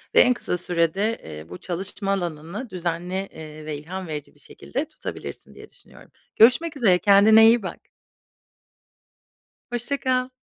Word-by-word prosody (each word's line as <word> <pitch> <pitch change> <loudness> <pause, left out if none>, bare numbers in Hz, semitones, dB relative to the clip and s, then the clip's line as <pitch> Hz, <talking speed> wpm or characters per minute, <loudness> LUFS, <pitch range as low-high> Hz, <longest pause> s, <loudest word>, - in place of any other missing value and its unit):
ve - - +9
en 250 - +5
kısa 180 -6 -1
sürede, 180 +6 0
eee, 75 +1 -9
bu 90 - -8
çalışma 195 +3 -4
alanını 175 - -4
düzenli, 175 0 -4 0.2
eee, 155 -1 -10
ve 155 -1 -4
ilham 180 +5 -7
verici 150 -2 -7
bir - - -25
şekilde 275 - -5
tutabilirsin - - -8
diye - - -13
düşünüyorum. - - -17 0.2
Görüşmek 285 +8 +4
üzere, 190 -9 +4
kendine 210 +3 +7
iyi 230 -1 +4
bak. 185 - -6 1.9
Hoşça 240 +4 -2
kal. 255 -1 0
190 Hz, 145 wpm, -24 LUFS, 165-230 Hz, 1.9 s, ve